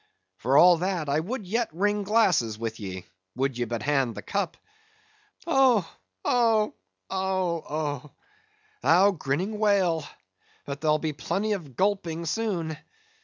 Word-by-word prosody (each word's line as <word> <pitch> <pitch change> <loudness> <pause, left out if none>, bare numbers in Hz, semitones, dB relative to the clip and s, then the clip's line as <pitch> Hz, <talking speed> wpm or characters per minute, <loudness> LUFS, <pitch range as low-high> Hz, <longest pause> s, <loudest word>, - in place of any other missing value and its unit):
For 130 +4 +2
all 175 +2 +8
that, 175 -3 -2
I 145 +2 +2
would 210 +6 -4
yet 230 +5 0
ring 205 +5 0
glasses 190 - +2
with 110 0 -4
ye, 95 -3 -6 0.3
would 135 0 0
ye 120 0 -1
but 115 -1 -4
hand 135 -5 +1
the - - -7
cup! 200 -4 -2 0.9
Oh, 260 - +4 0.4
oh! 225 -3 +3 0.4
oh, 185 -3 -1
oh! 145 -2 -3 0.7
thou 190 +4 +5
grinning 185 +6 -2
whale, 190 -7 +2 0.6
but 140 0 -6
there'll 155 -1 +3
be 155 0 -3
plenty 200 +8 -2
of 155 - -6
gulping 175 - 0
soon! 170 -5 -2
170 Hz, 135 wpm, -26 LUFS, 145-205 Hz, 0.9 s, all